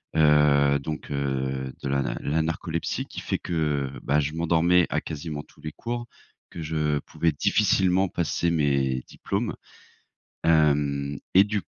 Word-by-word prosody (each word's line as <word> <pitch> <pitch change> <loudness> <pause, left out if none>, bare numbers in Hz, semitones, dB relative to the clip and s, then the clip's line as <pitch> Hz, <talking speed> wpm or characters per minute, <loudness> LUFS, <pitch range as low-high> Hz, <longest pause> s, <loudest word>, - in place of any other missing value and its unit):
Heu, 75 -2 +5
donc, 75 +2 -6
heu, 65 -1 -2
de - - -2
la 70 0 +1
na 65 - -3
la 75 +3 0
narcolepsie 80 0 -2
qui - - -8
fait - - -1
que, 75 -5 -1
bah, 75 +2 +2
je 75 +1 -1
m'endormais 85 +1 +3
à - - 0
quasiment 75 -1 -5
tous - - -22
les 75 - -5
cours, 120 +4 -5 0.4
que 85 - -8
je 75 -1 0
pouvais 80 +3 -1
difficilement 95 +6 +2
passer 85 0 0
mes 70 -5 +1
diplômes, 105 +3 -3 0.9
hem 70 -3 +2 0.2
et 95 - +9
du 105 0 -2
75 Hz, 150 wpm, -25 LUFS, 70-85 Hz, 0.9 s, et